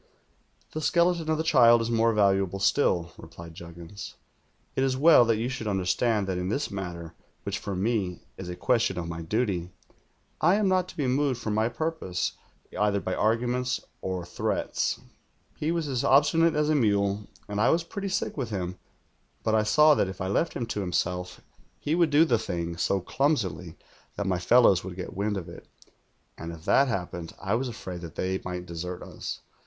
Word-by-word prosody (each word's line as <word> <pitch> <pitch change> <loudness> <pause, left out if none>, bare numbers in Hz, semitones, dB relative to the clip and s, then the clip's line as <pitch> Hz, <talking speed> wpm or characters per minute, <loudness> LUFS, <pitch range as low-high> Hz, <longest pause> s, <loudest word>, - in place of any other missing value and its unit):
"'The 155 - -4
skeleton 170 +1 +2
of 155 - +2
the 160 - -1
child 120 -7 +6
is 115 +1 -2
more 115 0 +3
valuable 100 -3 +2
still,' 95 -5 +2
replied 85 0 -11
Juggins. 85 +3 -9 0.6
'It 130 - +1
is 130 -1 +1
well 150 -3 +7
that 115 -1 +2
you 115 +2 -1
should 125 -4 -4
under 95 -3 -1
stand 105 +3 +1
that 95 -2 -2
in 90 +1 -2
this 140 +7 -1
matter 85 -4 -6 0.2
— - - -41
which - - -3
for 100 - -4
me 95 -3 -1
is 90 -2 -7
a 90 - -4
question 110 0 +1
of 85 -1 -3
my 85 0 -5
duty 90 -1 -1 0.4
— - - -37
I - - +5
am 210 -1 +2
not 185 -1 +2
to - - -12
be 145 - 0
moved 130 0 +1
from 110 -3 -2
my 110 +2 +2
purpose 160 - -2 0.4
v'ither 105 0 +1
by 95 -1 -3
arguments 125 +4 0 0.2
or 95 -2 -3
threats.' - - -1 0.6
"He 155 +2 -1
was 165 -3 -1
as 130 -3 -1
obstinate 150 +4 +4
as 150 0 +1
a - - +4
mule, 100 -5 +1 0.2
and 105 0 -2
I 115 - +4
was 165 +1 +2
pretty 195 +3 -5
sick 190 - -2
with 130 -5 -3
him; 90 -3 -4 0.6
but 110 - +1
I 110 - +4
saw 150 +8 +5
that 100 - +1
if 95 - -8
I 95 - -2
left 130 - 0
him 120 - -2
to 110 -3 -3
himself 90 -1 -2 0.4
ho 150 - +2
would 170 -2 +4
do 150 +3 +5
the 120 -7 +2
thing 85 -5 -3
so 95 +3 0
chimsily 95 - -1 0.4
that 100 - -3
my 95 -2 0
fellows 100 -2 +5
would 90 -1 -7
get 90 +1 -7
wind 105 +1 -1
of 90 -2 -6
it, 85 - -11 0.7
and 85 +1 -5
if 80 -1 -11
that 140 - +4
happened 90 -6 -4
I 95 - -2
was 125 +3 0
afraid 95 -7 -7
that 85 -3 -9
they 95 +1 -2
might 90 0 -5
desert 90 +1 -6
us. - - -7
105 Hz, 200 wpm, -27 LUFS, 90-130 Hz, 0.7 s, well